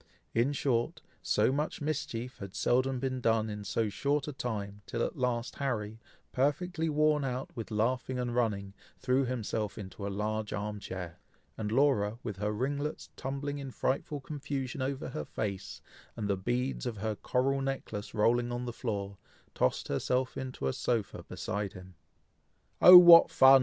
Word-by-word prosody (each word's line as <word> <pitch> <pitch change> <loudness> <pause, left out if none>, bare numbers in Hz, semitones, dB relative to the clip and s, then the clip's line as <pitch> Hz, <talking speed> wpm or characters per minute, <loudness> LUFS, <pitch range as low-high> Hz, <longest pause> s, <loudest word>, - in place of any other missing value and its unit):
In 120 +5 +2
short, 125 -4 -1 0.2
so - - +2
much 150 +3 -2
mischief 145 -5 -3
has 100 -1 -7
seldom 130 +4 +2
been 130 -1 -2
done 110 -2 +2
in 105 0 -6
so 110 +3 0
short 140 +8 -1
a 150 - -4
time, 105 -5 -4
till 115 - -1
at - - -2
last 125 -2 -1
Harry, 110 -5 -2 0.3
perfectly 160 +5 0
worn 150 -1 +3
out 130 +1 -4
with 115 -3 -5
laughing 125 +4 0
and 125 -1 -2
running, 105 -5 0 0.2
threw 130 +1 +1
himself 110 -4 -3
into 100 0 -6
a - - -2
large 105 +2 -2
arm 105 +2 -3
chair, 90 -3 -7 0.4
and 105 -1 -3
Laura, 115 -5 +2
with 105 -5 -4
her 105 +1 -1
ringlets 140 +7 -3
tumbling 140 +2 -4
in 135 -1 -6
frightful 140 +3 -1
confusion 140 -2 -4
over 135 0 -2
her 75 - -4
face, 100 +3 -5 0.3
and 110 -3 -3
the 100 - +2
beads 125 +7 -2
of 115 -3 -4
her 110 +1 -2
coral 135 +5 0
necklace 125 -6 -4
rolling 120 +3 +2
on 120 0 -3
the 120 - -4
floor, 100 -5 -4 0.3
tossed 65 - 0
herself 125 - 0
into 130 - -5
a 65 - +1
sofa 115 -4 -1
beside 100 -1 -4
him. 90 0 -11 0.9
"Oh! 180 0 +12
what 175 -1 +10
fun!" 135 0 +8
120 Hz, 165 wpm, -31 LUFS, 105-135 Hz, 0.9 s, Oh